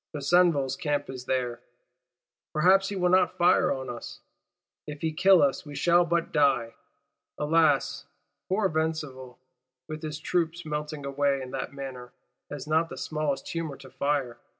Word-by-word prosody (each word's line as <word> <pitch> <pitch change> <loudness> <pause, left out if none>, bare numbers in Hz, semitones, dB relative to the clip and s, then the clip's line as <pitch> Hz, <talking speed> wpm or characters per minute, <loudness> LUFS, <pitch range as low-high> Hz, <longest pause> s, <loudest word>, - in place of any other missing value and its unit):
Besenval's 145 -3 +3
Camp 145 -3 -2
is 130 -1 -8
there; 125 -2 -1 0.9
perhaps 190 +5 +4
he 200 - -4
will 180 -1 +1
not 185 -1 +3
fire 175 - +4
on 130 -1 -3
us; 120 -1 -7 0.7
if 150 -1 -7
he 160 -1 -1
kill 185 0 +5
us 140 -1 +1
we 145 -1 -10
shall 175 +4 +4
but 170 0 -1
die. 140 -6 +2 0.6
Alas, 150 -2 +2 0.4
poor 195 +2 +2
Besenval, 155 -6 -3 0.5
with 155 -1 -6
his 155 -2 -5
troops 170 +1 -1
melting 150 -1 -4
away 140 0 +1
in 130 -1 -7
that 130 -1 -4
manner, 130 -3 -8 0.4
has 145 -2 -6
not 160 +2 +1
the - - -8
smallest 150 -3 -2
humour 160 -5 -4
to 130 - -14
fire! 140 -5 -1
150 Hz, 150 wpm, -27 LUFS, 135-165 Hz, 0.9 s, kill